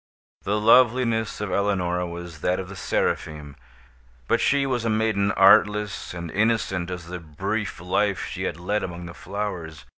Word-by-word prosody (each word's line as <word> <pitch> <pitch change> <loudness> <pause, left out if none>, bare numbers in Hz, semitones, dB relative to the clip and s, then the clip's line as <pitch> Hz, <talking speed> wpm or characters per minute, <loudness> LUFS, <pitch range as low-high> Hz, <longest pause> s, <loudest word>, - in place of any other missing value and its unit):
The 105 +1 0
loveliness 115 0 +3
of 105 -3 -3
Eleonora 90 -3 0
was 85 -2 -8
that 90 +1 +1
of 95 -1 -6
the 100 - -8
Seraphim; 75 -5 -2 0.7
but - - +2
she 140 -1 +3
was 125 -3 -1
a 115 - 0
maiden 110 -2 +1
artless 105 +1 +4
and 85 -1 -6
innocent 100 -4 0
as 90 -2 -6
the 90 +1 -6
brief 80 -3 -4
life 95 +3 0
she - - -4
had 80 - -3
led 105 +4 -1
among 90 -1 -6
the 85 - -8
flowers. 90 -8 -5
95 Hz, 160 wpm, -24 LUFS, 85-105 Hz, 0.7 s, artless